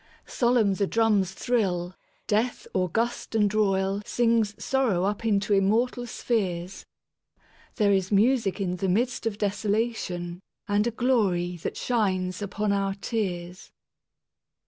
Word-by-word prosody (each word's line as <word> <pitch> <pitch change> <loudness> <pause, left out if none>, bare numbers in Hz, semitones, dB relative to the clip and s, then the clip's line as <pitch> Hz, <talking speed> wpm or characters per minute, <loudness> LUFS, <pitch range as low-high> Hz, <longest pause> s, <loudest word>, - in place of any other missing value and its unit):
Solemn 235 -5 +2
the 200 +1 0
drums 210 -4 +2
thrill; 185 -6 -1 0.3
Death 225 +4 0
august 225 +6 -1
and 210 -2 +3
royalSings 210 +2 +1
sorrow 245 -10 +1
up 205 +3 -1
into 205 -2 +1
immortal 230 +5 +1
spheres, 190 -6 -2 0.9
There 210 -4 +3
is 190 0 0
music 215 -1 +2
in 180 -2 -1
the 190 0 -1
midst 235 +4 0
of 210 -2 -3
desolationAnd 200 -4 -2 0.5
a - - +2
glory 210 -8 +1
that 165 - -5
shines 190 -6 0
upon 205 +1 -1
our 195 -1 0
tears. 185 -4 -4
205 Hz, 115 wpm, -26 LUFS, 190-230 Hz, 0.9 s, and